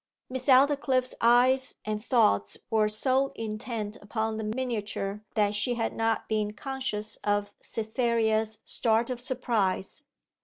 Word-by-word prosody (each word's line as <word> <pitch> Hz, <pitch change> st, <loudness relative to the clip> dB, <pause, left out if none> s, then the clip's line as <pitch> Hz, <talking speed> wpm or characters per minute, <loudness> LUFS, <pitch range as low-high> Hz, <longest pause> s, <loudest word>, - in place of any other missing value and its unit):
Miss 260 Hz, +1 st, -4 dB
Aldclyffe's 265 Hz, -1 st, +4 dB
eyes 250 Hz, +3 st, +4 dB
and 215 Hz, 0 st, -3 dB
thoughts 100 Hz, -, +2 dB
were 215 Hz, -1 st, +3 dB
so 260 Hz, +5 st, +2 dB
intent 215 Hz, -1 st, -4 dB
upon 220 Hz, +1 st, -2 dB
the 220 Hz, -, -3 dB
miniature 210 Hz, -3 st, -3 dB
that 205 Hz, -2 st, +2 dB
she 225 Hz, +4 st, 0 dB
had 225 Hz, -1 st, -1 dB
not 225 Hz, 0 st, 0 dB
been 210 Hz, -1 st, -1 dB
conscious 220 Hz, -3 st, -3 dB
of 205 Hz, 0 st, -1 dB
Cytherea's 220 Hz, -1 st, 0 dB
start 230 Hz, +1 st, +1 dB
of 245 Hz, -1 st, -4 dB
surprise. 235 Hz, -4 st, -1 dB
225 Hz, 125 wpm, -28 LUFS, 210-255 Hz, -, Aldclyffe's